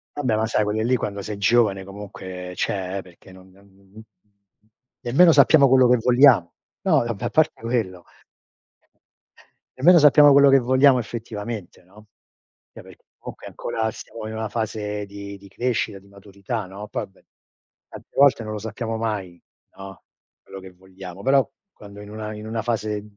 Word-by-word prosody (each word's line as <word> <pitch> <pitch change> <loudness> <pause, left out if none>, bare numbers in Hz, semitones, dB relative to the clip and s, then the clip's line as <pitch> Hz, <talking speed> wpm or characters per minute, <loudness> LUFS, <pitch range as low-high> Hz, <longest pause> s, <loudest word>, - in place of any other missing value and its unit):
Vabbè, 125 -7 -1
ma 110 - 0
sai 110 -1 0
quelle 105 +1 -2
lì 125 +3 +2
quando 100 -4 -4
sei 105 0 -6
giovane, 100 -1 +2
comunque 95 -2 -9
cioè, 95 0 -3
perché 90 +1 -18
non 95 0 -16
non 100 +2 -22
n 95 -1 -25 0.2
n - - -16
n - - -9
n - - -10 1.0
nemmeno 165 +8 +5
sappiamo 145 -3 +6
quello 130 -1 +5
che 125 - +5
vogliamo. 120 -8 +4 0.3
No, 155 -10 +2
vabbè, 115 -4 -5
a - - -1
parte 155 0 +1
quello 110 -7 -3 1.7
nemmeno 170 +7 +6
sappiamo 150 -1 +7
quello 140 0 +6
che 135 0 +6
vogliamo 130 +1 +4
effettivamente, 110 -3 -7
no. 100 +4 -19 0.7
Cioè - - -11
per - - -15 0.2
comunque - - -10
ancora 110 -1 -3
stiamo 110 0 -9
in 110 - -7
una 110 0 -4
fase 105 -2 -4
di 100 0 -9
di 100 - -16
crescita, 115 0 -2
di 100 - -22
maturità, 100 +2 -7
no; 100 +3 -9
poi - - -5
beh, 95 - -28 0.6
tante - - -13
volte 140 -4 +4
non 110 - -6
lo 105 - -5
sappiamo 115 +1 -5
mai, 100 -6 -4 0.4
no, 95 -2 -11 0.4
quello 95 - -11
che 95 0 -12
vogliamo. 95 0 -12
Però 135 0 +2 0.2
quando 100 - -13
in 105 - -11
una 110 0 -6
in 105 0 -9
una 110 0 -3
fase 110 -2 -3
110 Hz, 175 wpm, -22 LUFS, 100-120 Hz, 1.7 s, sappiamo